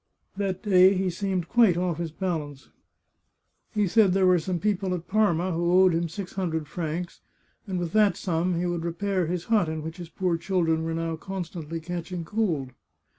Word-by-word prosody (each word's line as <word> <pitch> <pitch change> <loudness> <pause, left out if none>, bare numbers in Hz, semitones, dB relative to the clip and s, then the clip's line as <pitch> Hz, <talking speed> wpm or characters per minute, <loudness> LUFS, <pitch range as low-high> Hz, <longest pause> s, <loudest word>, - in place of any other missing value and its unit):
That 195 -2 -2
day 190 -2 +6
he 185 -1 0
seemed 185 -1 -2
quite 225 -6 +4
off 175 -2 -1
his 170 -1 -2
balance. 155 -5 -4 1.0
He 210 -2 +1
said 200 -1 +4
there 190 0 +3
were 180 -1 +5
some 180 +2 -2
people 195 -1 0
at 175 -1 -7
Parma 185 -4 +2
who 170 +1 0
owed 185 -2 +5
him 165 0 0
six 180 +2 -7
hundred 160 -5 -2
francs, 170 +2 -4 0.5
and 190 -2 -2
with 175 -2 -2
that 210 -3 +3
sum 175 0 0
he 175 - -1
would 175 -1 -2
repair 180 +1 -1
his 175 0 -2
hut, 210 -7 +2
in 160 -1 -4
which 160 +2 -6
his 175 -2 -8
poor 180 -1 -1
children 165 -2 0
were 165 0 -2
now 165 0 -2
constantly 170 -3 -5
catching 175 +1 -5
cold. 165 -10 -1
175 Hz, 185 wpm, -26 LUFS, 165-190 Hz, 1.0 s, day